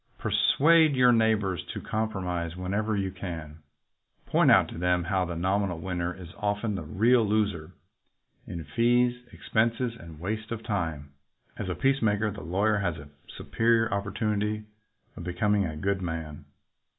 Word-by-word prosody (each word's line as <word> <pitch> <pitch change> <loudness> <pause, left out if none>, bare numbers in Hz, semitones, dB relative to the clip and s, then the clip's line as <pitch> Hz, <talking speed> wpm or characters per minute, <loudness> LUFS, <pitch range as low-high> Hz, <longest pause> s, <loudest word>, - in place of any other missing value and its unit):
"Persuade 160 0 +4
your 125 -1 +6
neighbors 110 -6 +2
to - - -3
compromise 90 -6 -3
whenever 100 +4 -1
you 95 -1 -1
can. 80 -5 -7 0.7
Point - - +3
out - - +6
to - - -8
them 90 0 +2
how 95 +2 0
the 85 0 -5
nominal 95 +1 0
winner 90 0 -3
is 90 -1 -10
often 105 +1 -1
the 95 - -3
real 110 +10 +3
loser— 105 -7 -1 0.7
in 85 -1 -6
fees, 120 - +2
expenses, 115 +2 0
and 85 -8 -12
waste 110 +5 -4
of 115 -1 -4
time. 80 -9 -3 0.4
As 95 - -5
a 90 - -2
peacemaker 110 -2 +1
the 100 - -8
lawyer 100 +6 +1
has 90 -5 -1
a 75 0 -11 0.3
superior 115 -1 +1
opportunity 105 +1 -1 0.5
of - - -8
becom 90 +4 +1
ing 100 - +2
a 75 -1 -6
good 100 +4 -1
man. 80 -3 -5
100 Hz, 150 wpm, -27 LUFS, 85-110 Hz, 0.7 s, your